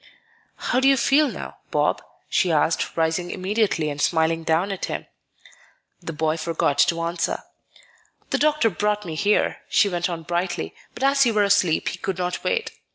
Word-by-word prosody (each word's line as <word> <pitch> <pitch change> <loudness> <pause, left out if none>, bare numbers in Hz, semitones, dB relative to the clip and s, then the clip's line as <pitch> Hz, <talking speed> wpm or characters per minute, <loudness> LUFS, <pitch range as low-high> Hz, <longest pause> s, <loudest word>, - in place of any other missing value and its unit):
"How 250 - 0
do 265 - +3
you 275 0 +5
feel 280 +5 +4
now, - - -8
Bob?" - - +1 0.3
she 180 - +1
asked, 160 +2 +1
rising 165 +2 0
immediately 190 -4 0
and 145 -1 -4
smiling 165 0 +1
down 165 +5 +1
at 195 - -3
him. - - -5 1.0
The 165 - -5
boy 160 0 -1
forgot 160 -3 -1
to 165 +4 +3
answer. 170 0 -2 0.9
"The - - +1
doctor 300 -7 +3
brought 210 +2 -1
me 165 - -5
here," 205 +6 +1
she 205 - +4
went 175 -1 -1
on 165 -2 -5
brightly; 175 - -2 0.2
"but 260 - -5
as 275 0 +4
you 225 - 0
were 210 - +4
asleep, 200 -5 +2
he - - -7
could 190 - -3
not 180 -1 -3
wait. 470 -1 -1
180 Hz, 175 wpm, -23 LUFS, 165-210 Hz, 1.0 s, you